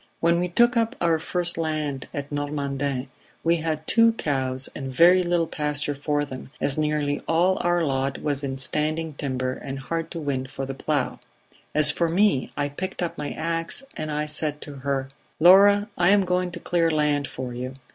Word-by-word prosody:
"When 170 +1 +3
we 180 - 0
took 240 +7 +3
up 230 +2 +1
our 165 -2 +2
first 175 +1 -2
land 155 -4 -2
at 145 0 -5
Normandin 140 -2 -2 0.4
we 170 +1 +3
had 160 -1 -3
two 230 +4 +4
cows 130 - 0
and 135 -2 -5
very 175 +7 +6
little 175 -1 +1
pasture 150 -2 -2
for 145 +1 -1
them, 130 -2 -9
as 140 - +1
nearly 150 -2 0
all 175 +3 +2
our 175 -1 +2
lot 135 -2 -1
was 145 -1 -1
in 135 -1 -3
standing 155 +4 0
timber 130 -2 -2
and 135 +1 -6
hard 165 +4 -4
to 170 - -6
win 135 -4 -2
for 135 0 -5
the 135 - -5
plough. 140 0 -2 0.6
As 150 0 +6
for 170 +2 0
me, 180 -5 +2
I 145 -1 0
picked 185 +6 -5
up 170 - -3
my 145 - -4
ax 165 - -2
and 155 0 -4
I 150 0 -1
said 150 0 -1
to 145 -2 -8
her: 135 0 -2 0.3
'Laura, 200 +4 +7
I 175 +1 +3
am 200 -1 +4
going 180 0 0
to 170 - -6
clear 170 -1 +1
land 150 -2 +1
for 125 -1 -6
you.' 125 +2 -5
150 Hz, 190 wpm, -24 LUFS, 140-170 Hz, 0.6 s, Laura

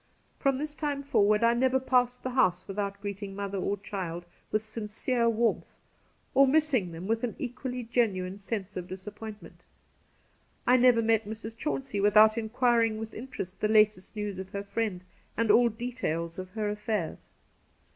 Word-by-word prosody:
From 275 -1 +2
this 300 +1 -4
time 290 -2 -2
forward 210 -5 +3
I 230 0 +5
never 260 +2 +2
passed 250 -1 +1
the 255 - -2
house 185 -9 +2
without 200 0 -3
greeting 200 -1 -5
mother 200 -1 -3
or 200 +2 -1
child 180 -4 -5 0.3
with 215 0 +1
sincere 225 +2 -1
warmth, 230 +1 0 0.6
or 275 +1 +6
missing 265 - +2
them 165 +2 -7
with 225 +3 0
an 240 - -2
equally 250 0 -4
genuine 200 -5 0
sense 200 -1 -4
of 180 -1 -5
disappoint 210 +3 -8
ment. - - -15 1.0
I 250 - +6
never 245 -2 +5
met 225 -1 +2
Mrs. 220 +1 -7
Chauncey 265 -4 -3
without 215 +2 +6
in 225 -2 -3
quiring 235 -2 +2
with 220 0 -6
interest 215 -6 -7
the 210 - +3
latest 215 -3 +3
news 205 -3 -4
of 190 0 -6
her 200 0 -4
friend 200 -2 -2 0.4
and 230 -1 +3
all 240 0 +6
details 215 -8 -3
of 185 0 -6
her 215 -1 -1
affairs. 210 -4 -3
220 Hz, 165 wpm, -29 LUFS, 200-245 Hz, 1.0 s, or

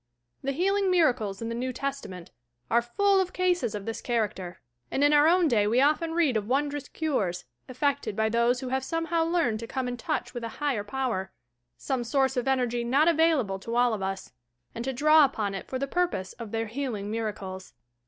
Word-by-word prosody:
The 275 - -1
healing 390 +5 +1
miracles 245 - +1
in 230 - -3
the - - -3
New 250 +2 -2
Testament 245 -10 -5 0.4
are 235 - +4
full 390 - +2
of 365 -1 -3
casea 355 - 0
of 200 -1 -6
this 225 - -4
character; 210 -7 -2 0.3
and 275 - 0
in 290 +1 +5
our 295 +1 +6
own 350 0 +4
day 210 -7 +2
we 235 +4 +3
often 310 +4 +2
read 315 -8 +2
of 210 -1 -1
won 280 +4 +1
drous 290 -1 -6
cures, 200 - -1 0.2
effected 275 -3 -1
by 220 +1 +1
those 235 +2 +2
who 260 - -4
have 265 0 -1
somehow 330 +2 0
learned 325 -10 +1
to 230 - -6
come 260 0 -3
in 245 0 -4
touch - - -3
with 240 -2 -5
a 230 -1 -6
Higher 280 -8 0
Power, 210 -4 -2 0.3
— 120 0 -53
some 245 - -2
source 265 +2 +1
of 250 - -1
enei^ 250 -3 +1
not 275 +7 +3
available 310 - +2
lo 230 - -2
all 245 -1 +3
of 210 - -3
lis.— 195 0 -4 0.4
and 230 - -5
to 265 - -1
draw 305 +4 +5
upon 215 -8 0
it 195 - -6
for 260 - -3
the 275 - -1
purposes 275 - -1
of 230 -2 -6
their 225 +1 -2
"healing 225 -4 -4
miracles." 200 -4 -5
250 Hz, 210 wpm, -27 LUFS, 220-295 Hz, 0.4 s, our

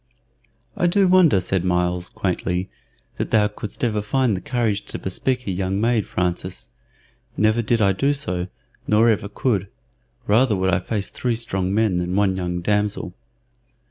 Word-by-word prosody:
"I 175 - +2
do 195 +2 +3
wonder," 180 - +5
said 90 -1 -1
Myles, 90 0 0
quaintly, 90 0 -2 0.5
"that - - -2
thou 105 -2 +4
couldst 105 0 -7
ever 110 -3 +1
find 125 +1 +1
the 90 - -5
courage 110 -3 -1
to - - -5
bespeak 125 +7 -2
a 100 - -2
young 95 +1 -1
maid, 115 -1 +1
Francis. 90 +1 -3 0.7
Never 110 +3 +3
did 115 0 +1
I 100 - +4
do 135 +9 +1
so, 90 -11 -2 0.4
nor 110 +2 +4
ever 100 -2 0
could. 105 -3 0 0.6
Rather 110 +2 +3
would 95 0 +1
I - - +3
face 105 -4 -2
three 120 -2 -1
strong 95 -5 -2
men 105 -3 +2
than 90 +1 -2
one 100 -2 +2
young 90 -1 -3
damsel." 105 -2 -1
105 Hz, 165 wpm, -22 LUFS, 95-115 Hz, 0.7 s, wonder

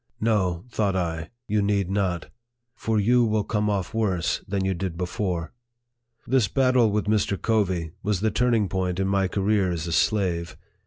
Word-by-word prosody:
" - - -45
No," 95 -5 0
thought 100 -5 0
I, 80 -3 -2
" 120 - -57
you 105 0 +1
need 100 -2 0
not; 95 -4 -1 0.4
for 110 -1 0
you 120 +4 +4
will 110 -2 +1
come 105 0 0
off 100 0 -2
worse 100 -7 0
than 95 -1 -1
you 95 - +1
did 90 -2 -4
before." 90 -1 -3 0.7
This 130 -4 +2
battle 130 +1 +3
with 105 +1 0
Mr. 105 -2 +1
Covey 95 -8 0
was 100 -2 -1
the 110 0 +1
turning 120 -4 +2
point 95 -1 -2
in 95 - +1
my 95 -1 +2
career 100 0 +1
as 85 -2 -3
a 85 - -4
slave. 90 -2 0
100 Hz, 180 wpm, -25 LUFS, 90-110 Hz, 0.7 s, you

